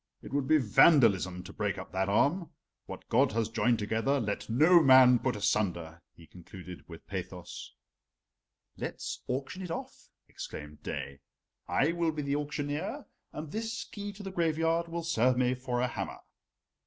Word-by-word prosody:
"It - - -10
would 140 -2 0
be 155 - +5
vandalism 105 - +4
to - - -11
break - - -2
up - - -8
that 95 +1 -1
arm. 145 - +2 0.4
What - - -9
God 130 +1 +3
has 115 -1 0
joined 115 +1 +2
together 115 +7 0
let 105 -2 -3
no 160 +9 +6
man 130 -3 +7
put 125 -2 -1
asunder," 85 -5 -1
he 85 - -15
concluded 90 +2 -11
with 80 -1 -11
pathos. - - -7 1.0
"Let's - - -5
auction 135 +8 -3
it 180 - -6
off," 165 - -7 0.2
exclaimed 75 0 -9
Daae. 70 0 -5 0.5
"I 150 +4 +2
will 170 -1 0
be 150 -1 -4
the 140 0 -1
auctioneer, 145 0 -3 0.3
and 150 -1 -7
this 225 +2 -3
key 205 -1 -7
to 200 +1 -10
the 195 - -5
graveyard 165 -1 +1
will 170 0 -4
serve 130 -6 +2
me 125 0 +2
for 125 -1 -2
a 125 - +2
hammer." - - -5
130 Hz, 165 wpm, -30 LUFS, 105-160 Hz, 1.0 s, man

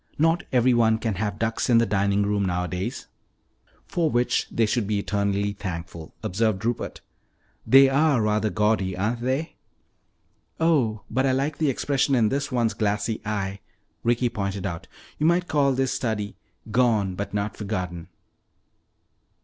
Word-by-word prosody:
Not 165 +4 +2
everyone 120 -3 +4
can 110 -1 -2
have 105 -2 -2
ducks 115 +2 -1
in 120 - +6
the 115 - +4
dining 100 0 +1
room 100 0 0
nowadays." 90 0 -2 0.8
"For 165 -3 0
which 120 -2 +1
they 115 - +1
should 110 -1 0
be 105 -1 0
eternally 100 0 -1
thankful," 85 -4 -7
observed 110 +1 0
Rupert. 120 0 -3 0.7
"They 135 +1 +8
are 140 0 +3
rather 105 0 +1
gaudy, 105 -2 0
aren't 110 +5 -1
they?" 130 +6 -2 1.0
"Oh, 135 -10 +2
but 130 +4 +1
I 130 - +2
like 140 +3 -1
the 155 -3 +2
expression 135 +1 +1
in 110 -4 +3
this 140 +3 -2
one's 120 -3 +1
glassy 105 +1 -1
eye," 100 -2 -3 0.4
Ricky 120 +1 +1
pointed 100 -3 -3
out. 85 -4 -5 0.3
"You 155 - +3
might 175 +1 +2
call 140 -3 +2
this 130 0 0
study 105 -4 -2 0.4
'Gone 110 -5 +2
But 100 +2 -5
Not 100 0 -2
Forgotten.'" 90 -5 -4
110 Hz, 150 wpm, -25 LUFS, 100-130 Hz, 1.0 s, They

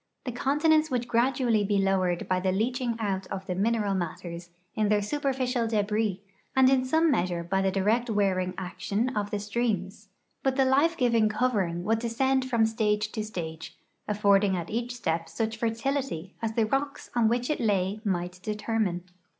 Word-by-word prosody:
The 250 - -2
continents 310 +5 +2
would 245 -2 -1
gradually 235 -2 +2
he 200 0 +1
lowered 190 -3 +1
hy 185 0 +1
the 185 0 0
leaching 240 +4 0
out 195 -3 -2
of 195 -1 -5
the 185 - -2
mineral 210 +1 +1
matters 175 -1 -5 0.2
in 215 -2 +1
their 210 0 +4
superficial 255 -1 -1
debris, 210 -2 0 0.3
and 265 0 +6
in 260 -1 +3
some 320 +4 +3
measure 175 -7 -1
hy 195 0 +2
the 195 - +2
direct 215 +6 +1
wearing 190 -3 +1
action 200 +6 -2
of 205 -1 -1
the 205 - -2
streams, 205 -2 -2 0.3
hut 265 -1 +1
the 270 -1 +3
life 290 +6 +3
giving 230 -4 +3
covering 205 -7 0
would 220 +4 +1
descend 260 +3 0
from 230 -3 +3
stage 215 -1 0
to 215 - -3
stage, 160 -6 -6 0.3
affording 200 -1 +3
at 170 -1 -5
each 240 +2 -2
step 165 -8 -2
such 225 +2 -2
fertility 230 - -2
as 225 -1 -2
the 225 -1 +2
rocks 275 +5 -2
on 235 -2 +4
which 240 +4 0
it - - -1
lay 200 -2 +1
might 180 -3 -2
determine. 210 -4 -1
215 Hz, 175 wpm, -27 LUFS, 190-245 Hz, 0.3 s, and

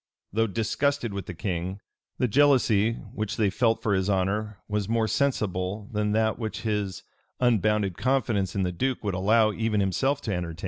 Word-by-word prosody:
[] - - -44
Though 115 +1 +2
disgusted 115 +4 -1
with 100 -2 -5
the 90 - -6
king, 95 0 -3 0.4
the 125 - +2
jealousy 115 -4 +4 0.2
which 110 -1 -3
they 105 -3 +2
felt 115 +2 +1
for 105 - +1
his 95 +1 +1
honor 100 +2 0
was 105 -1 -2
more 115 -1 +2
sensible 105 -6 -1
than 105 -1 0
that 110 +1 +1
which 110 -1 -4
his 105 -3 -2 0.4
unbounded 105 -5 +2
confidence 110 -8 0
in 100 - +1
the 90 - 0
duke 130 +9 -2
would 100 -2 -1
allow 110 +4 +3
even 110 -1 0
himself 130 +9 +1
to 105 - -2
entertain. 85 -2 -4
105 Hz, 180 wpm, -26 LUFS, 95-115 Hz, 0.4 s, jealousy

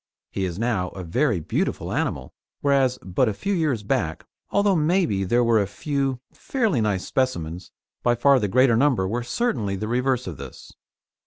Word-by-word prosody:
He 95 - -2
is 90 -1 -4
now 105 -5 0
a 95 - -6
very 115 - +1
beautiful 75 - -2
animal, - - -2 0.3
whereas 135 -3 +2
but 95 +6 +1
a 105 - -3
few 200 - -2
years 150 - 0
back, 80 -5 -1 0.2
although 200 -1 +2
maybe 155 - +1
there 120 +6 +2
were 115 -2 +4
a 100 - -1
few 135 +4 -2
fairly 225 - 0
nice 100 -4 0
specimens, 90 -10 -2 0.3
by 120 - +2
far 135 +3 +4
the 105 - 0
greater 125 +3 +4
number 120 -6 +2
were 120 +5 -2
certainly 120 - -1
the 110 +3 -4
reverse 125 +1 0
of 85 -6 -6
this. - - -10
120 Hz, 175 wpm, -24 LUFS, 100-140 Hz, 0.3 s, were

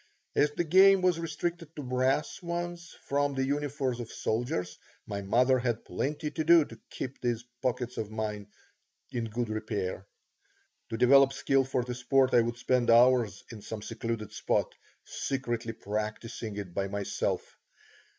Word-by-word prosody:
As 150 - +4
the 175 - 0
game 190 +3 +6
was 180 -2 +3
restricted 165 0 -4
to 150 - -5
brass 130 +6 0
ones 175 0 -4
from 140 0 0
the 135 0 +1
uniforms 140 -3 -1
of 115 -2 -6
soldiers, 100 -6 -2 0.3
my 100 -1 -4
mother 125 +6 +3
had 120 -2 -2
plenty 150 +2 -2
to 160 - -2
do 165 -1 +6
to 115 -4 -13
keep 130 +1 -6
those 120 -1 -1 0.2
pockets 125 -1 -2
of 110 - -3
mine 105 -1 -4 0.6
in 120 -3 -2
good 115 +2 -2
repair. 100 -3 -3 0.8
To 115 - -3
develop 135 +3 +6
skill 135 0 +2
for 130 -1 -1
the 125 0 -4
sport 130 +2 +2
I 120 - +7
would 120 +1 -2
spend 125 -1 +1
hours 115 -4 +5
in 110 -3 -9
some 105 0 -6
secluded 115 -1 -4
spot, - - 0 0.3
secretly 120 -4 -3
practising 110 +1 -4
it 100 -4 -6
by 100 +2 -1
myself. 100 0 -3
125 Hz, 155 wpm, -29 LUFS, 110-140 Hz, 0.8 s, I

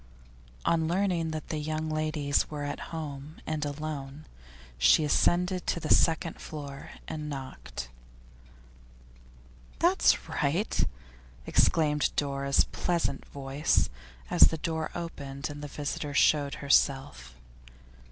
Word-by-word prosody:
On 165 -1 +2
learning 175 -2 +1
that 155 -1 -5
the 155 - -2
young 155 +1 -2
ladies 155 -2 0
were 150 -1 -4
at 145 0 -3
home 150 -2 -6
and 155 -1 -2
alone, 145 0 -5 0.5
she - - +6
ascended 180 +4 +2
to - - 0
the 155 - +3
second 165 0 +2
floor 140 -3 -7 0.2
and 150 -1 -5
knocked. 135 - -6 1.9
'That's 360 +3 +3
right!' 165 +9 0 0.6
exclaimed 150 -2 +3
Dora's 140 -1 +2
pleasant 170 -6 -2
voice, 140 +2 0 0.4
as - - +8
the 160 - -2
door 160 0 -2
opened 140 -4 -5
and 145 0 -8
the - - -4
visitor 145 0 -4
showed 145 -1 +3
herself. 135 - +1
150 Hz, 115 wpm, -29 LUFS, 140-160 Hz, 1.9 s, as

